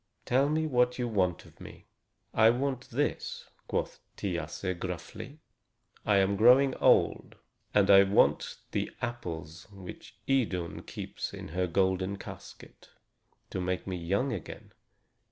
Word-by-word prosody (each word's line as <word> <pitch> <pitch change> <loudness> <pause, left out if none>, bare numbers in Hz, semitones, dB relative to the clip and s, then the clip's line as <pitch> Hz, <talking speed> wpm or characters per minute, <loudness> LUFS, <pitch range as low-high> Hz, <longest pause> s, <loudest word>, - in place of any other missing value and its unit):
Tell 135 +3 +3
me 155 +1 +1
what 125 -4 +2
you 125 -1 -1
want 95 -6 0
of - - -19
me?" - - -11 0.5
"I 110 0 +6
want 130 +1 -1
this," 145 +5 -2 0.2
quoth - - -2 0.2
Thiasse 95 -2 -3
gruffly. 95 - -6 0.7
"I 105 -2 +5
am 100 +1 +2
growing 130 +5 +6
old, - - +3 0.4
and 100 -1 +4
I 100 0 +9
want 100 +1 +3
the - - -1
apples 85 -9 -5
which 95 -3 -11
Idun 100 -11 0
keeps - - -6
in - - -8
her 90 +3 -1
golden 95 +2 +1
casket, - - -12 0.6
to 95 - -2
make 90 0 -2
me 95 - -3
young 100 +10 0
again. 95 - -8
100 Hz, 135 wpm, -30 LUFS, 90-125 Hz, 0.7 s, I